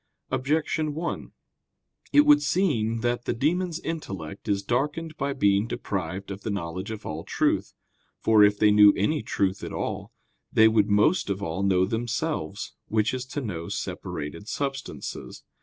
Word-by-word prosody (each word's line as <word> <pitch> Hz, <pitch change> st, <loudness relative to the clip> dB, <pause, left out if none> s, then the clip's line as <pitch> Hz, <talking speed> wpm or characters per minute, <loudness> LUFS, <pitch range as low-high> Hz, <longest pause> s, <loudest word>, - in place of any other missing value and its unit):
Objection 150 Hz, +3 st, 0 dB
1: 170 Hz, +2 st, -4 dB, 0.8 s
It 295 Hz, -, +7 dB
would 295 Hz, 0 st, +7 dB
seem 115 Hz, -, +1 dB
that 120 Hz, 0 st, -1 dB
the -, -, -1 dB
demons' 170 Hz, +6 st, 0 dB
intellect 100 Hz, -, -6 dB
is 100 Hz, -1 st, 0 dB
darkened 150 Hz, +7 st, -1 dB
by 140 Hz, -2 st, -2 dB
being 100 Hz, -5 st, +2 dB
deprived 95 Hz, -2 st, -4 dB
of 100 Hz, +1 st, -6 dB
the 110 Hz, -, -4 dB
knowledge 95 Hz, 0 st, -4 dB
of 110 Hz, -1 st, -6 dB
all 80 Hz, +1 st, -4 dB
truth. -, -, 0 dB, 0.4 s
For 110 Hz, -2 st, +5 dB
if 105 Hz, 0 st, +4 dB
they 105 Hz, 0 st, +5 dB
knew 105 Hz, -1 st, +8 dB
any 150 Hz, +10 st, +1 dB
truth 95 Hz, 0 st, -1 dB
at -, -, -5 dB
all, -, -, -4 dB, 0.4 s
they 110 Hz, -, +6 dB
would 110 Hz, -2 st, +3 dB
most 105 Hz, -, +3 dB
of 100 Hz, 0 st, -2 dB
all 85 Hz, +1 st, -2 dB
know 95 Hz, -2 st, +3 dB
themselves; 115 Hz, -, -3 dB
which 110 Hz, +1 st, +1 dB
is 130 Hz, 0 st, -4 dB
to 145 Hz, +2 st, -4 dB
know 85 Hz, -9 st, -5 dB
separated 85 Hz, +7 st, -5 dB
substances. 135 Hz, +1 st, -5 dB
110 Hz, 155 wpm, -26 LUFS, 100-145 Hz, 0.8 s, knew